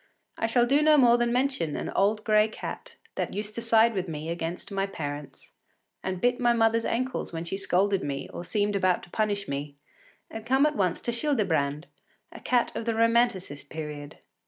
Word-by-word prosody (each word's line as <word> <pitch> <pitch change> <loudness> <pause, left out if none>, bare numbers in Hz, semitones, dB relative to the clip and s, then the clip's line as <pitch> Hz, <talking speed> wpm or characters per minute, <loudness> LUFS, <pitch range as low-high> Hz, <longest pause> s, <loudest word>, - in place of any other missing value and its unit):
I 225 - -1
shall 240 +1 +3
do 280 +4 +3
no 305 0 +5
more 240 -3 +5
than 240 0 +1
mention 250 - 0
an - - -4
old 210 +2 +1
gray 215 -1 +4
cat 220 - -7 0.2
that - - -3
used 210 +1 -4
to 235 - -4
side 230 0 +4
with 190 -2 -2
me 155 0 -5
against 170 +3 -4
my 195 0 -1
parents, 145 -6 -7 0.5
and 185 -1 -3
bit 245 +4 +1
my 240 -1 +3
mother’s 230 0 +2
ankles 255 +2 -2
when 165 0 -5
she 170 - -3
scolded 195 0 +1
me 140 -1 -4
or - - -6
seemed 205 +2 0
about 185 -2 +1
to 175 - -14
punish 205 -2 -1
me, 140 +1 -4 0.6
and 225 - -7
come 265 +4 +3
at 300 0 +1
once 185 -6 0
to 240 - 0
Childebrand, 195 - 0 0.5
a - - -10
cat 245 -1 +1
of 230 - -4
the 230 -1 0
Romanticist 230 -9 +1
period. 150 -2 -7
210 Hz, 195 wpm, -27 LUFS, 170-235 Hz, 0.6 s, no